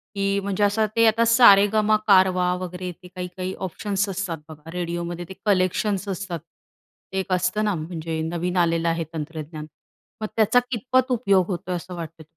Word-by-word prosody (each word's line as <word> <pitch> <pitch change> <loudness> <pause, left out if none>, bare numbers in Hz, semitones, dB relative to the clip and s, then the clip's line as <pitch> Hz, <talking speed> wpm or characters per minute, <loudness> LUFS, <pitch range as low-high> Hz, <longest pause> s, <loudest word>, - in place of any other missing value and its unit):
की 195 0 +1
म्हणजे 200 +1 -1
असं 210 +2 +3
ते 230 0 +5
आता 230 +1 +3
सारेगमा 215 -2 +6
कारवा 185 -2 +4
वगैरे 180 0 -5
ते 180 - -15
काही-काही 180 +1 -5
ऑप्शन्स 200 +3 -2
असतात 180 -3 -3
बघा 155 +1 -11
रेडिओमध्ये 175 0 -4
ते - - -6
कलेक्शन्स 195 +1 +1
असतात. 185 -3 -4
ते 170 +3 -11
एक 190 0 -4
असतं 185 +4 +1
ना 210 - +1
म्हणजे 160 0 -4
नवीन 175 +3 -2
आलेलं 170 -1 +2
आहे 165 0 -1
तंत्रज्ञान. 155 0 -6 0.6
मग 215 - -1
त्याचा 225 +2 +4
कितपत 255 +3 +1
उपयोग 200 -7 +3
होतोय 180 -1 -3
असं 180 +1 -7
वाटतं? 165 -1 -8
185 Hz, 160 wpm, -23 LUFS, 170-205 Hz, 0.6 s, सारेगमा